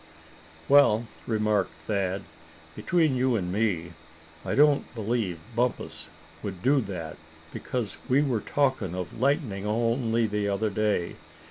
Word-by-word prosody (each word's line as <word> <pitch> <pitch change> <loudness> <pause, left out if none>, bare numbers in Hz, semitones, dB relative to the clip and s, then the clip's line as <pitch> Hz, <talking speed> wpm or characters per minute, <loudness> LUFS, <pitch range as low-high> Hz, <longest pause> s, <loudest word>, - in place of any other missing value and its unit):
"Well," 130 -5 +5 0.2
remarked 105 -3 +1
Thad, 95 -2 -1 0.5
"between 160 -6 +2
you 130 -1 +2
and 90 -4 -1
me 95 -6 0 0.5
I - - -2
don't 145 0 +4
believe 110 -6 -2
Bumpus 125 +1 -2 0.3
would 95 -2 -6
do 135 +2 +4
that, 90 -7 -6 0.4
because 120 -5 -3
we 135 +3 +4
were 125 -7 0
talking 130 - 0
of 90 +3 -5
lightning 125 - 0
only 115 +1 +1
the 105 -1 -1
other 105 +2 0
day. 105 -4 0
110 Hz, 125 wpm, -27 LUFS, 100-125 Hz, 0.5 s, Well